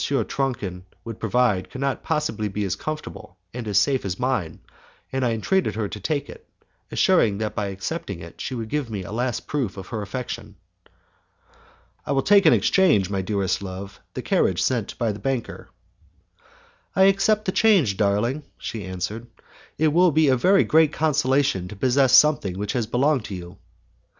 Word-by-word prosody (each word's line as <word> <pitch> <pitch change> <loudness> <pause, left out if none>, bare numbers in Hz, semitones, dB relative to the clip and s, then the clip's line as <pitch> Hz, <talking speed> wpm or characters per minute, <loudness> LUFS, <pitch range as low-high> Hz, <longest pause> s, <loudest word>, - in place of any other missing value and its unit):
Tronchin 120 -7 -2 0.2
would 115 -2 -7
provide 110 -4 +1
could 130 - -8
not 140 0 -1
possibly 135 -9 -1
be 105 +1 -3
as 95 -2 -1
comfortable 150 -8 -7 0.2
and 120 -2 -6
as 100 -2 +1
safe 135 +3 +2
as 95 -1 -3
mine, 125 -10 -1 0.6
and 135 0 0
I 120 - +2
entreated 115 - 0
her 110 -2 -1
to 105 - -7
take 145 +7 -2
it, - - -13 0.4
assuring 105 - +3
her - - -5
that 105 - -5
by 105 -3 -1
accepting 100 - -5
it 85 0 -11
she 130 - -4
would 115 -2 -4
give 145 -3 -2
me 100 -4 -4
a 90 - -9
last 120 +1 -2
proof 125 -10 -3
of 95 - -8
her 110 -3 -4
affection. 105 -1 -6 1.5
"I 145 - -2
will 135 - +1
take 200 -1 +5
in - - +8
exchange, 145 - +3
my 95 -1 -1
dearest 100 0 -1
love, 95 +1 -7 0.2
the - - -4
carriage - - +1
sent - - -1
by 115 -2 0
the 105 - -7
banker." 130 +1 -4 1.3
"I 190 - +5
accept 195 +2 +3
the 185 - 0
change, 185 - +3
darling," 105 +8 0 0.2
she 110 -3 -6
answered, 95 +6 -5 0.5
"it 155 0 +3
will 175 +3 +4
be 155 -1 +3
a 130 - +4 0.3
great 160 -1 +4
consolation 135 - +1
to 105 - -9
possess 130 +4 +2
something 140 -12 +4
which 105 +1 -3
has 120 -4 -1
belonged 130 +1 +1
to 100 - -6
you." 90 +1 -9
115 Hz, 180 wpm, -23 LUFS, 100-145 Hz, 1.5 s, in